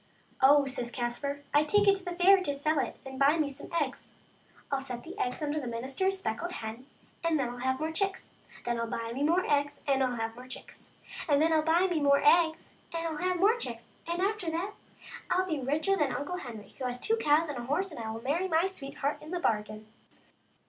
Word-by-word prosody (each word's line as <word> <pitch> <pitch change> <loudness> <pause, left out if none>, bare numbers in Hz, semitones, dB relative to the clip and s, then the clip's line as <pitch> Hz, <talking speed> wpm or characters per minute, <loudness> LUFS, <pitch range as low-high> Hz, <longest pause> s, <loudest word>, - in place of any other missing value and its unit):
" - - -25
Oh," 280 +2 +7
says 255 -3 -4
Caspar, 265 +4 -3
" - - -32
I 290 - +6
take 415 +7 +3
it 395 - +8
to 385 - -10
the 355 -1 -4
fair 375 +2 +6
to 285 -6 -1
sell 305 +2 +1
it 255 - -2
and 265 0 -7
buy 285 +4 +5
me 310 -2 +1
some 280 +1 -10
eggs, 280 -3 -4 0.6
ril 275 -1 +1
set 250 -3 -6
the - - -9
eggs 250 +4 -2
under 300 +1 0
the 265 - -5
minister's 265 +12 -1
speckled 345 +1 -3
hen, 225 +2 -6 0.4
and 335 -1 +2
then 265 -4 0
Til 245 - -7
have 260 +1 0
more 315 +1 -1
chicks. 390 +3 -2 0.3
Then 240 -1 0
Til 230 0 -1
buy 230 0 -3
me 265 - -4
more 335 +5 +3
eggs 290 0 +1
and 275 -1 +2
have 235 -3 -1
more 250 +2 -11
chicks, 260 - -9 0.4
and 285 -1 +5
then 320 +2 +3
ril 315 -1 +4
buy 325 +4 +3
me 350 -4 +1
more 280 -1 +5
eggs 325 +1 +4 0.2
and 330 -2 -3
have 365 0 0
more 425 +6 +5
chicks, 235 - -4 0.2
and 340 +2 -1
after 400 -4 0
that 340 +5 -2 0.6
I'll 370 +1 +2
be 315 -5 -2
richer 300 +9 +1
than 295 -7 +1
Uncle 290 +6 -3
Henry, 230 - -8
who 260 - -3
has 250 0 -3
two 450 - +1
cows 315 -5 +3
and 285 -5 -4
a 240 - -5
horse, 355 +8 -1
and 305 - -8
will 225 +1 -7
marry 330 +8 0
my 330 0 +3
sweetheart 285 -5 -3
into 315 +4 -6
the - - -1
bargain." 215 -5 -1
290 Hz, 230 wpm, -30 LUFS, 255-345 Hz, 0.6 s, it